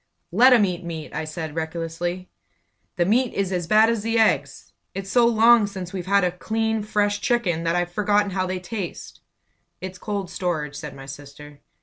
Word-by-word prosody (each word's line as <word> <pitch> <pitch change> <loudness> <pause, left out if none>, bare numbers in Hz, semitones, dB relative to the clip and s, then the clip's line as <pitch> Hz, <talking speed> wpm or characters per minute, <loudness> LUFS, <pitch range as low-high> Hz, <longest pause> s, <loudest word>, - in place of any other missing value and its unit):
"Let 245 +9 +6
'em 235 -5 +6
eat 180 -1 -4
meat!" 160 -2 -7
I 155 +1 -3
said, 155 0 -6
recklessly. 165 +3 -4 0.6
"The 175 -3 +1
meat 240 +6 +1
is 195 -1 -1
as 175 -3 -2
bad 215 +4 +5
as 230 -2 0
the 225 +2 0
eggs! 225 - +1 0.2
It's 195 0 -5
so 240 -2 +5
long 230 -1 +5
since 190 -3 -7
we've 185 -2 -5
had 200 0 +3
a 180 - +2
clean, 220 +4 -1
fresh 205 -1 0
chicken 185 -9 0
that 165 +1 +1
I've 175 0 -1
forgotten 205 +1 +1
how 185 0 -1
they 185 0 -3
taste!" 185 0 -7 0.6
"It's 185 0 -7
cold 200 -4 -4
storage," 165 -6 -2
said 150 -2 -7
my 135 - -10
sister. 145 +1 -11
185 Hz, 190 wpm, -23 LUFS, 170-210 Hz, 0.6 s, Let